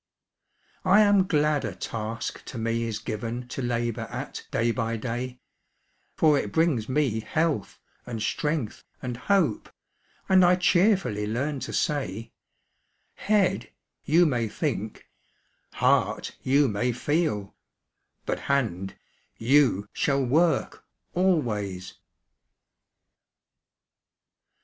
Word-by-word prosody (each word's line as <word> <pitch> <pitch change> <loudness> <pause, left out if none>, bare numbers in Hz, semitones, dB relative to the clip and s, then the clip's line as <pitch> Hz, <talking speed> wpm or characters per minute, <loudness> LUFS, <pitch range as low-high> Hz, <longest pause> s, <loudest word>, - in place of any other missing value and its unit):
I 195 +3 +6
am 205 -2 +4
glad 150 -3 +2
a 105 -6 -4
task 115 +4 -5
to - - -7
me 115 +1 -1
is 110 -2 -3
given 115 +4 -5
To 135 - -4
labor 120 -2 -2
at - - -6
day 115 +1 +1
by 115 +1 -2
day; 125 +2 -4 0.8
For 150 -3 +4
it 105 - -4
brings 150 -9 +1
me 130 -5 +1
health, 155 -2 -1 0.3
and 115 -2 -4
strength, 150 +1 -2 0.2
and 125 -1 -3
hope, 160 - +1 0.6
And 190 -1 +6
I 180 +1 +6
cheerfully 180 - +2
learn 135 +6 -2
to - - -5
say 115 -7 -2 0.8
'Head, 205 -2 +1 0.3
you 170 +4 +4
may 125 -7 +1
think; - - -4 0.7
heart, - - +1
you 140 +2 +3
may 120 +3 0
feel; 125 - -1 0.7
But - - -2
hand, 105 -9 0 0.4
you 120 -5 +3
shall 140 -1 +1
work 160 +7 +1 0.3
always!' 105 - 0
125 Hz, 105 wpm, -26 LUFS, 115-155 Hz, 0.8 s, I